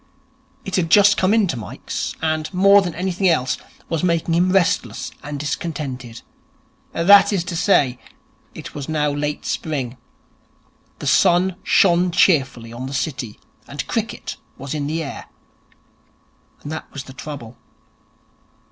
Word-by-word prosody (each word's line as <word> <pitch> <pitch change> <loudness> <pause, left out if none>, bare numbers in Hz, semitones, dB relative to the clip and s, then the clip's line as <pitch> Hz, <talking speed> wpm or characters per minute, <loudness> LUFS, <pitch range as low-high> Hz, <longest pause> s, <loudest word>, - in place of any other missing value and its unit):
It 190 -1 -2
had 165 -3 0
just 205 +3 +6
come 185 +1 +2
into 210 -10 +2
Mike's, 110 -4 -5
and, 155 -1 -1
more 200 +2 +6
than 175 -4 -4
anything 185 +2 0
else, 130 -6 +1 0.3
was 165 +1 -2
making 170 -1 +1
him 180 +2 +3
restless 190 0 +1
and 145 0 -6
discontented. 140 -5 -5 0.7
That 200 +5 +6
is 190 -4 0
to 175 0 -5
say, 140 -8 +2 0.6
it - - -9
was 145 0 -6
now 150 -2 +1
late 145 +1 -3
spring: 135 -6 -3 1.0
the - - -8
sun 175 +7 +3
shone 180 -2 +4
cheerfully 130 - +2
on 125 +2 -6
the 135 - -5
City; 130 -7 -3 0.3
and - - -5
cricket - - -4 0.2
was 135 +2 -6
in 145 -2 -2
the 160 +2 -2
air. 140 - -7 1.4
And 145 - -6
that 160 - -6
was 140 - -6
the 130 - -12
trouble. 130 -5 -8
155 Hz, 140 wpm, -21 LUFS, 135-180 Hz, 1.4 s, just